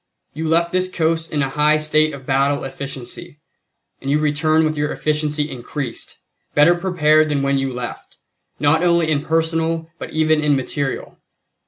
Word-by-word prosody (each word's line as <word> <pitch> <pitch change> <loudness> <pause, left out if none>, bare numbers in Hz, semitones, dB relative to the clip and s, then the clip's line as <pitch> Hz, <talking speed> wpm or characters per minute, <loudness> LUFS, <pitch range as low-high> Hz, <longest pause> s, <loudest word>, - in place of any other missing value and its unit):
You 160 +2 -3
left 170 +2 +2
this 185 0 0
coast 165 -2 -1
in 150 -1 0
a 135 - -1
high 150 +2 +3
state 155 0 +2
of 140 -3 -10
battle 140 +2 +1
efficiency, 135 +1 -8 0.6
and 135 - -4
you 145 - +3
return 155 +1 +2
with 155 0 -1
your 150 0 -1
efficiency 150 -1 -1
increased; 125 0 -6 0.4
better 150 +4 +6
prepared 155 -4 +2
than 140 -2 0
when 140 0 +1
you 135 0 -2
left, 125 -1 -7 0.4
not 150 +3 +3
only 170 -2 +2
in 145 -1 0
personnel 165 0 -1
but - - -6
even 155 -1 +2
in 150 -1 +3
material. 135 +1 -3
150 Hz, 165 wpm, -20 LUFS, 140-160 Hz, 0.6 s, better